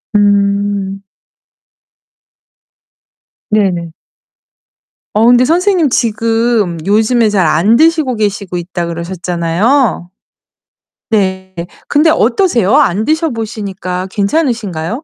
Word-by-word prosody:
음. 200 -1 +1 2.5
네네. 185 -6 0 1.2
어 215 +2 +2
근데 245 0 +5
선생님 345 +1 +2
지금 225 -5 0
요즘에 220 +3 +2
잘 195 -4 +1
안 165 +9 +3
드시고 315 -3 +2
계시고 200 -3 -3
있다 175 0 -4
그러셨잖아요. 175 +5 -1 1.0
네. 190 -3 -1 0.3
근데 305 +2 +3
어떠세요? 260 - +2
안 220 -8 +2
드셔 315 +1 0
보시니까 200 -5 -5
괜찮으신가요? 205 - -1
210 Hz, 200 characters per minute, -13 LUFS, 185-245 Hz, 2.5 s, 근데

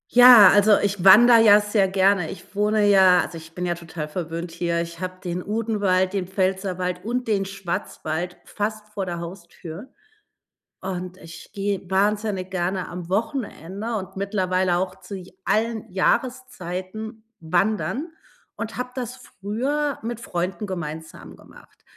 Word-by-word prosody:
Ja, 245 -5 +10
also, 205 +1 +5
ich 200 -3 -1
wandere 230 +4 +8
ja 210 -2 +7
sehr 205 -2 +1
gerne. 190 -2 +2
Ich 190 0 -11
wohne 210 0 +2
ja 190 -3 +6
also, - - -6
ich 160 +1 -15
bin 180 - -3
ja 175 - 0
total 165 -2 -7
verwöhnt 165 +1 -5
hier. 170 0 -1
Ich 170 0 -7
habe 185 0 -4
den 180 0 -3
Odenwald, 205 -3 0
den 190 -3 -2
Pfälzerwald 185 -1 -2
und 245 +2 -2
den 200 -3 +1
Schwarzwald 180 -2 -4
fast 215 0 -4
vor 200 -3 -4
der 175 -1 -4
Haustür, 170 +4 -9 0.9
und 185 -1 -5
ich 165 -2 -12
gehe 195 -2 -3
wahnsinnig 200 -1 0
gerne 185 0 -2
am 175 -1 -7
Wochenende 220 - -3
und 190 -2 -6
mittlerweile 185 -3 0
auch 185 +1 -3
zu 190 +2 -8
j 185 0 -12
allen 225 0 0
Jahreszeiten 220 -1 -2 0.2
wandern 210 - -1 0.5
und 225 -1 -6
habe 250 0 -3
das 250 -1 -5
früher 260 +6 -3
mit 235 0 -4
Freunden 185 -1 -3
gemeinsam 160 -4 -7
gemacht. - - -19
190 Hz, 145 wpm, -23 LUFS, 180-215 Hz, 0.9 s, Ja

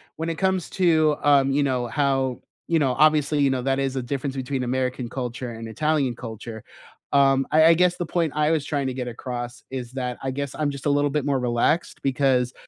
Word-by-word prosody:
When 160 +1 -3
it 165 - -2
comes 190 -3 0
to, 160 -5 +3
um, 140 -2 +4
you 145 +1 +2
know, 125 -3 0
how, 135 -2 0 0.3
you 165 -1 +2
know, 135 -3 +1
obviously, 155 -1 +3
you 140 - +4
know, 130 -1 -1
that 135 +1 0
is 135 -1 -1
the 130 - -1
difference 135 +2 -4
between 130 0 -2
American 125 -1 -2
culture 125 -1 -5
and 115 0 -7
Italian 145 +1 0
culture. 110 -1 -8 0.5
Um, 135 -1 +4
I 155 +1 +6
I 165 - +8
guess 180 +1 +2
the 175 - -2
point 165 -1 0
I 150 +1 +2
was 155 -3 +1
trying 140 -3 -1
to 130 - -2
get 125 -1 -4
across 120 0 -6
is 125 -2 -6
that 125 -2 -3
I 135 - -1
guess 140 0 -4
I'm 150 -2 -1
just 140 0 -9
a - - +2
little 145 0 +2
bit 150 -1 -1
more 140 -2 +1
relaxed, 125 +7 0
because 130 -2 +1
135 Hz, 220 wpm, -24 LUFS, 125-150 Hz, 0.5 s, I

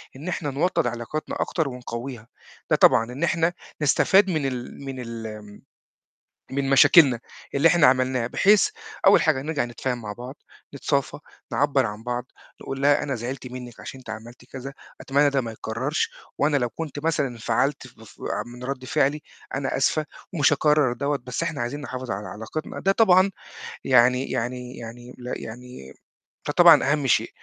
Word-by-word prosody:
إن 145 +6 -9
إحنا 170 -4 -2
نوطّد 150 0 +1
علاقتنا 120 +6 -4
أكتر 160 -4 -1
ونقوّيها، 125 -2 -7 0.4
ده - - +4
طبعًا 115 +2 +4
إن 135 +6 -5
إحنا 170 0 +2 0.3
نستفاد 190 +6 +4
من 155 -5 0
ال 125 -1 -5
من 135 -1 -6
الم 110 -3 -8 0.9
من 135 0 -1
مشاكلنا 135 -2 +6 0.3
اللي 140 +4 +5
إحنا 170 -4 +5
عملناها 130 -1 +2
بحيث 200 - +4 0.4
أول - - +7
حاجة 140 -4 +2
نرجع 145 -2 -1
نتفاهم 120 +1 -4
مع 105 -1 -5
بعض، 125 +5 -9 0.4
نتصافى، 140 0 -1 0.3
نعبّر 140 -3 +2
عن 105 +1 -7
بعض، 125 0 -3 0.3
تقول 135 0 -6
لها 145 +1 +4
أنا 145 -2 -2
زعلت 125 +3 -5
منِّك 125 -2 -9
عشان 135 - -9
أنتِ 125 - -10
عملتِ 115 +3 -9
كذا، 135 +1 -8 0.3
أتمنى 145 +1 +2
ده 140 -1 +1
ما 115 -3 -5
يتكرّرش 115 +7 -2 0.3
وأنا 145 0 +2
لو 120 -3 +1
كنت 145 +5 -6
مثلًا 150 -4 +1
انفعلت 120 +3 -1
ف 125 -3 -19
ف 110 - -16
آآ - - -2
من 120 +1 -10
رَد 130 0 -4
فعلي 140 +3 +1 0.3
أنا 135 -1 -2
آسفة 155 +3 +1 0.3
ومش 145 -6 +3
هاكرّر 150 -3 +3
دَوّة، 140 +3 -1
بس 125 +5 -3
إحنا 160 -5 -2
عايزين 120 +5 -3
نحافظ 130 -3 -6
على 100 +2 -4
علاقتنا، 110 +9 -6
ده 195 - +3
طبعًا 190 -2 +5 0.5
يعني 125 +1 +4
يعني 125 +1 -4
يعني 120 +1 -9
ل 125 0 -7
يعني 120 - -10 0.5
فطبعًا 140 - +6
أهَم 150 -3 +1
شيء - - +2
130 Hz, 165 wpm, -24 LUFS, 120-145 Hz, 0.9 s, أول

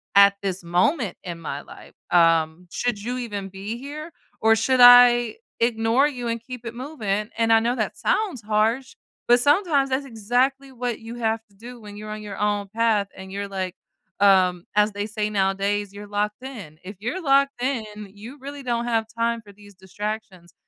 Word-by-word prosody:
at 200 0 +7
this 190 -2 -3
moment 185 - +1
in 170 -2 -6
my 145 -3 -5
life? - - -14 0.2
Um, 165 0 +3
should 240 -4 -2
you 245 +2 -3
even 205 -5 -4
be 200 +4 -6
here, 300 +5 -8 0.3
or 225 0 +5
should 255 +4 +1
I 245 - +8 0.2
ignore 230 +3 +3
you 250 -5 -5
and 230 0 -2
keep 245 0 -9
it 230 - -5
moving?" 220 -6 -3
And 230 0 +2
I 225 - +7
know 235 +2 0
that - - -2
sounds 390 - 0
harsh, 220 +5 0 0.3
but 240 +1 +6
sometimes 290 0 +3
that's 265 +2 -1
exactly 255 +4 0
what 245 -2 -3
you 230 +1 -8
have 225 -1 -1
to 200 - -26
do 240 +4 -11
when 205 -1 -10
you're 215 0 -8
on 215 - -6
your 205 -2 -7
own 205 0 0
path 220 -2 +1
and 190 0 -10
you're 200 +1 -4
like, 190 -2 -4 0.4
um, 185 -3 +4
as 210 +1 +4
they 205 +1 -4
say 210 -1 -2
nowadays, 195 +1 0
"You're 205 +1 -9
locked 210 +3 -2
in." 205 - -9
If 195 +2 -9
you're 245 - -3
locked 275 -2 +3
in, 215 -6 -3
you 225 +8 -11
really 280 +1 -8
don't 240 -2 -1
have 225 -2 +1
time 230 0 0
for 205 -2 -15
these 205 0 -16
distractions, 190 -1 -6
220 Hz, 190 wpm, -23 LUFS, 200-245 Hz, 0.4 s, I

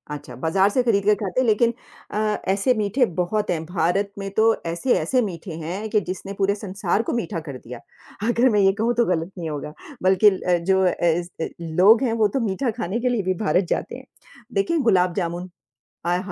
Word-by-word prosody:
अच्छा, 140 -4 -10
बाज़ार 190 +5 +3
से 255 +5 +1
खरीद 210 -5 +2
के 210 - +5
खाते 200 +2 -3
हैं 255 - 0
लेकिन 230 +2 +3 0.4
अ, - - -3 0.4
ऐसे 210 +6 +2
मीठे 220 +4 +1
बहुत 210 +4 0
हैं, 165 -2 -2
भारत 180 +4 0
में 195 0 -4
तो 220 - +5 0.2
ऐसे-ऐसे 245 +9 +1
मीठे 185 -4 -5
हैं 190 +7 -4
कि 210 0 +2
जिसने 190 +2 -5
पूरे 200 +1 +2
संसार 200 0 -1
को - - 0
मीठा 205 -6 -4
कर 140 -2 -6
दिया। 125 -1 -10 0.5
अगर 240 +2 +3
मैं 210 - +2
ये 195 - +5
कहूँ 235 +2 +2
तो 240 - +4
गलत 175 0 -1
नहीं 165 -2 -4
होगा। 150 0 -5 0.3
बल्कि 190 +3 +6
ल 190 - -4
अ, 180 -1 +4
जो 190 +2 +2
ऐसे 170 -1 -1
लोग 185 +9 +4
हैं 235 -3 +1
वो - - +6
तो - - +1
मीठा 230 +6 -1
खाने 195 +7 -2
के 250 - 0
लिए 240 -3 0
भी 185 - +1
भारत 185 -1 +2
जाते - - -4
हैं। - - -13 0.5
देखिए 395 -5 +1
गुलाब 180 -2 +3
जामुन 175 -1 -3 0.6
अहा, 175 +1 +2
195 Hz, 205 wpm, -23 LUFS, 175-215 Hz, 0.6 s, बल्कि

